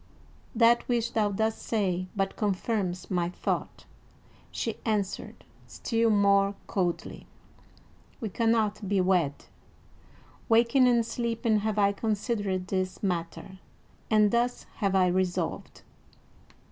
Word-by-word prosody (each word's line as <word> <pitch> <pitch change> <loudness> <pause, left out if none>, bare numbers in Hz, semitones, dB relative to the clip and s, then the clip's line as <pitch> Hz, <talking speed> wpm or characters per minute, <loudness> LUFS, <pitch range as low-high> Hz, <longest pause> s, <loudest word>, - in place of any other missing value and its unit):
"That 235 +1 +5
which 235 -1 0
thou 215 -2 +2
dost 220 +2 -1
say 185 -5 -1
but 195 -1 -1
confirms 195 -3 -2
my 175 -2 0
thought," 180 - -4 0.6
she - - -3
answered, 210 -4 -3 0.2
still 230 -1 0
more 200 -1 +3
coldly. 180 -3 -3 0.9
"We 225 -5 -4
cannot 215 -2 0
be 200 -1 +2
wed; 180 -6 +1 1.0
waking 235 +3 +5
and 235 -2 +3
sleeping 230 -2 0
have 215 0 -2
I 200 -1 +4
considered 205 -3 -2
this 185 0 -2
matter, 185 +1 -3 0.5
and 210 -2 +4
thus 240 +1 0
have 195 -2 0
I 185 -1 +5
resolved." 180 -1 -2
205 Hz, 110 wpm, -28 LUFS, 185-225 Hz, 1.0 s, That